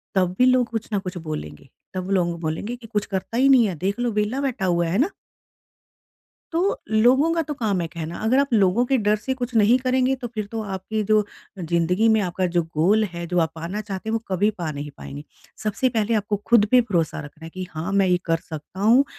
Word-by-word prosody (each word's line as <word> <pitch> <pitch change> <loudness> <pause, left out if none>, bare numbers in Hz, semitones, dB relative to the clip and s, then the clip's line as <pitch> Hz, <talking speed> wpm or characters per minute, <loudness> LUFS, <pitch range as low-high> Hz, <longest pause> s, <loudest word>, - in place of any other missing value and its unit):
तब 185 -2 +2
भी 250 - +5
लोग 255 -1 +4
कुछ 225 -1 -4
न 200 - +2
कुछ 185 -1 -6
बोलेंगे 75 - -6 0.2
तब 185 +1 -4
लोग 170 -2 -1
बोलेंगे 165 +9 -3
कि 235 -2 -13
कुछ 210 -2 -1
करता 195 +4 -4
ही 270 +2 +5
नहीं 250 -5 +6
है 185 - -3
देख 195 +8 -2
लो 240 -1 0
वेला 210 +6 -1
बैठा 260 -8 -1
हुआ 175 -2 +1
है 180 +5 0
ना? 310 +10 +2 1.4
तो 360 +5 0
लोगों 255 +9 +4
का 330 - +1
तो - - -1
काम 215 -8 0
है 170 - -1
कहना 165 0 -6
अगर 250 +4 +3
आप 280 -2 +1
लोगों 210 +2 +4
के 270 - +2
डर 210 0 +2
से 260 +5 -3
कुछ 245 -1 -5
नहीं 220 +4 +5
करेंगे 255 +1 +1
तो 240 - -3
फिर 215 -2 -3
तो 225 -1 -2
आपकी 215 +3 -3
जो 215 -1 +5 0.3
ज़िंदगी 175 +5 +1
में 220 - +3
आपका 185 0 -1
जो 170 - +4
गोल 200 +8 +4
है 170 0 -5
जो 180 +1 -1
आप 160 - 0
पाना 170 +6 -4
चाहते 205 0 -6
हैं - - -1
वो 225 - +2
कभी 195 +3 +2
पा 165 -3 -2
नहीं 145 +1 -6
पाएँगे। 145 +2 -8 0.4
सबसे 215 +5 +1
पहले 225 -1 0
आपको 205 -1 0
खुद 225 -3 +5
पे 255 - +7
भरोसा 180 -9 -1
रखना 155 +2 -11
है 165 - -8
कि 185 +1 -6
हाँ, 165 +4 -4
मैं 195 -1 +3
ये 180 - +3
कर 165 -1 +2
सकता 155 +4 -8
हूँ, 235 +7 +5
205 Hz, 235 wpm, -23 LUFS, 175-235 Hz, 1.4 s, पे